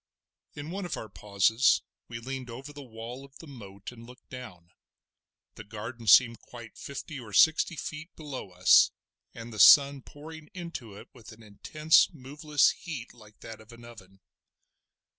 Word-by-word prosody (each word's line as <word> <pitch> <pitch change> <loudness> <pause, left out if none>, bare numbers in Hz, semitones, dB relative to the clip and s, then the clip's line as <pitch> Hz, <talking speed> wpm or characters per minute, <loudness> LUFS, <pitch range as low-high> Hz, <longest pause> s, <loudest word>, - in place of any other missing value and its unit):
In 150 +2 -7
one 195 +2 -5
of - - -5
our 110 - -8
pauses 105 +5 +1 0.2
we 115 - -7
leaned 130 +1 -7
over 135 +5 -9
the 145 - -10
wall 120 +1 -9
of 140 0 -16
the - - -13
moat 100 -9 -11
and 115 -1 -14
looked 125 +4 -17
down. 90 -10 -11 0.8
The 110 - -11
garden 110 +3 -9
seemed 115 +1 +6
quite 120 -2 -13
fifty 140 +1 -8
or 110 -4 -12
sixty 160 - +4
feet 160 +2 -7
below 145 -9 -8
us, 90 0 +5 0.5
and 115 0 -9
the 110 - -8
sun 140 +2 +7
pouring 155 +3 -13
into 170 - -8
it - - -14
with 120 -4 -14
an 110 +1 -17
intense, 150 +9 +2
moveless 145 +1 0
heat 140 -9 -8
like 105 -3 -19
that 110 -1 -10
of 110 +2 -17
an 115 0 -14
oven. 95 -5 -15
120 Hz, 165 wpm, -28 LUFS, 110-145 Hz, 0.8 s, sun